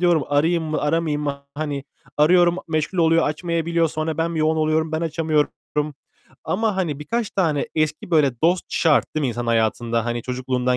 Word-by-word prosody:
diyorum 175 -4 +3
"Arayayım 160 +3 +2
mı? 155 0 -2
Aramayayım 150 0 0
mı?" 140 -1 -3
Hani, 145 -2 -3 0.3
arıyorum 175 +3 +4
meşgul 155 +3 -1
oluyor 165 0 +4
açmayabiliyor. 165 +1 0
Sonra 155 +1 -3
ben 165 +1 0
bir 160 - -1
yoğun 155 +1 +2
oluyorum. 155 0 +1
Ben 160 - -1
açamıyorum 155 -2 0 0.9
ama 215 +1 0
hani 165 -7 -1
birkaç 215 +9 -2
tane 160 -7 0
eski 155 +2 -1
böyle 140 -7 +2
dost 175 +2 +3
şart 160 -3 +2
değil 155 - 0
mi 135 - +1
insanın 120 0 -3
hayatında? 115 0 +1
Hani 120 0 -2
çocukluğundan 125 0 -1
155 Hz, 175 wpm, -22 LUFS, 145-165 Hz, 0.9 s, arıyorum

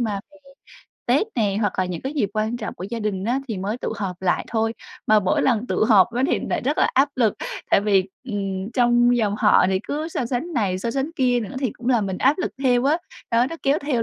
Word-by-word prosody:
mà 210 -4 -1
về 295 - -19 0.7
Tết 275 - +3
nè, 205 -5 +1
hoặc 205 -3 +1
là 185 - +2
những 180 -2 -4
cái 270 - -3
dịp 250 -10 -1
quan 215 +2 -1
trọng 225 -2 -5
của 180 - -7
gia 235 - -3
đình 205 -3 -2
á, 245 +5 0
thì 215 -4 -3
mới 205 +6 -3
tụ - - -3
họp 190 -3 -5
lại 185 - +1
thôi. 225 0 0 0.3
Mà 215 0 +5
mỗi 185 - +1
lần 240 -2 +1
tụ - - +1
họp 220 0 +5
á, 245 - 0
thì - - 0
lại - - 0
rất 280 +5 -1
là - - +4
áp 270 +2 +4
lực, 225 -5 +2 0.4
tại - - +5
vì, 200 -2 +2 0.2
ừm, 200 -3 -3
trong 240 0 +4
dòng 210 -4 +1
họ 210 -3 +5
thì 190 0 +1
cứ 305 +3 -3
so 255 - -2
sánh 260 +8 -3
này, 195 - 0
so 230 - -2
sánh 275 +5 -2
kia 250 -2 +2
nữa, 230 +4 -6
thì 260 -5 0
cũng 240 +1 -6
làm 235 -5 +2
mình 190 -1 -4
áp 280 +5 +3
lực 365 - -1
theo 250 -2 +3
á, 300 +4 +3 0.3
đó, 235 +2 +3
nó 330 - -5
kéo 280 +2 +2
theo 280 -6 -1
230 Hz, 255 wpm, -22 LUFS, 205-255 Hz, 0.7 s, Mà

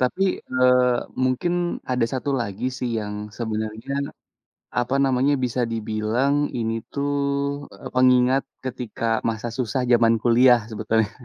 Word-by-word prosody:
tapi, 130 +9 +1 0.2
eee, 125 -1 +3 0.3
mungkin 130 +7 0 0.4
ada 125 -2 +2
1 135 +2 -2
lagi, 105 +1 -4
sih, 125 - -2
yang 105 -1 -4 0.2
sebenarnya, 110 +2 -4 0.9
apa 125 +2 0
namanya, 135 +1 +2
bisa 125 0 -1
dibilang 110 +5 0 0.2
ini 115 -1 -1 0.2
tuh, 140 0 -1 0.6
eee, - - -9
pengingat 130 +1 +4 0.2
ketika 125 -3 -5 0.2
masa 115 +1 -2
susah 125 +1 -1
zaman 115 -1 +5
kuliah 120 0 +5
sebetulnya. 110 0 0
125 Hz, 125 wpm, -23 LUFS, 110-130 Hz, 0.9 s, zaman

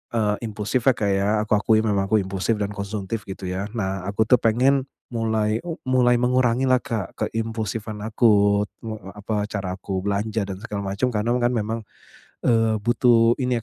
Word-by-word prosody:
eee, 105 -2 +1
impulsifnya 110 +5 +1
ya, - - -22
Kak, 105 - 0
ya, 100 +1 +1
aku 110 - -12
akui 110 +1 +3
memang 100 -3 +1
aku 110 - +3
impulsif 95 +4 -1
dan 100 - -1
konsumtif 105 +1 -4
gitu 95 0 -7
ya. 95 +2 -2
Nah 95 -3 -2
aku 100 +2 +1
tuh 125 - +7
pengen 130 +4 +3 0.3
mulai 110 -2 0 0.3
mulai 125 -1 +4
mengurangi 125 0 +2
lah 130 - +5
Kak, 110 -6 -4
ke - - 0
impulsifan 110 -1 -3
aku 105 -2 +4 0.2
eee, 110 -4 -6
apa, 105 0 -2
cara 95 -3 -3
aku 95 -1 -3
belanja 105 +1 -1
dan 95 - -5
segala 105 -3 -4
macam. 125 +5 +1
Karena 115 +2 0
kan 120 - +3
memang, 115 0 -1 0.7
eee, 115 -2 +3
butuh 120 0 +4
ini 125 -1 +1
110 Hz, 175 wpm, -23 LUFS, 100-115 Hz, 0.7 s, tuh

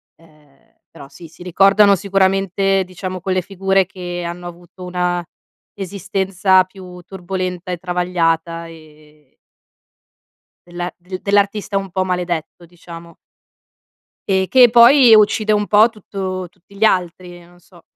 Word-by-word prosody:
ehm, 150 -4 -26 0.2
però 140 -4 -13
sì, 170 +4 -14
si 165 - -15
ricordano 195 +3 +4
sicuramente 195 0 0
diciamo 185 0 -7
quelle 185 0 -1
figure 195 0 0
che 180 -2 -7
hanno 175 +1 -7
avuto 175 +1 -13
una 180 -1 -2 0.5
esistenza 195 -1 0
più 185 -1 -13
turbolenta 185 -1 -5
e 180 - -3
travagliata 170 -2 -2
e 155 -3 -18 1.3
della 175 0 -6
del 185 +1 -9
dell'artista 200 0 0
un 195 0 -4
po' 185 +1 -1
maledetto, 175 -2 -4
diciamo. 170 0 -13 1.1
E 190 -1 +1
che 250 0 +6
poi 240 +1 +7
uccide 215 0 +2
un 210 -1 +1
po' 215 +3 +4
tutto 190 -4 -6
tutti 190 +2 -23
gli 210 - -1
altri, 180 -3 -1
non 175 +1 -21
so. 175 -1 -21
185 Hz, 125 wpm, -18 LUFS, 175-195 Hz, 1.3 s, poi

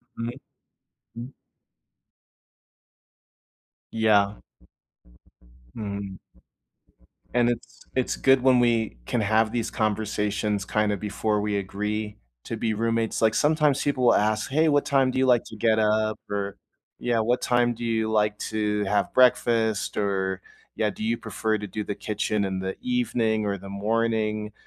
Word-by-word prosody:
Mhm. 115 +1 -3 0.8
Mm. 120 +4 -8 2.6
Yeah. 105 -2 +2 1.3
Mhm, 100 -2 -5 1.1
and 120 -1 +3
it's 120 -1 -5
it's 130 -1 0
good 135 -1 +4
when 130 -1 +5
we 115 - +1
can 120 - 0
have 110 +1 +2
these 120 -1 -2
conversations 105 -1 -1
kinda 105 +1 0
before 105 +1 -1
we 105 0 -1
agree 105 +2 -3 0.3
to 115 - -4
be 110 0 -1
roommates, 115 +1 -1
like, 110 -1 +3
sometimes 150 -2 +2
people 140 -3 0
will - - +6
ask, 110 +2 +1
"Hey, 155 +3 +3
what 145 -1 +3
time 135 -2 +3
do 130 - -3
you 130 - +3
like 120 -2 +4
to 110 - -10
get 110 0 +2
up?" 110 0 +1
or 100 -1 -3 0.4
"Yeah, 120 -2 0
what 120 +3 +1
time 120 -1 +2
do 120 - -7
you 110 -1 0
like 105 -1 +1
to 105 -1 0
have 100 0 0
breakfast?" 115 -4 +3
or 95 -2 -1 0.3
"Yeah, 105 -1 0
do 110 - -7
you 115 +1 +1
prefer 110 +1 -2
to 105 - -5
do 105 +1 -5
the 105 - -3
kitchen 105 0 -2
in 95 -1 -2
the 95 0 -4
evening 120 - 0
or 100 -1 -1
the 95 +1 -10
morning?" 110 +1 -1
110 Hz, 145 wpm, -25 LUFS, 105-120 Hz, 2.6 s, will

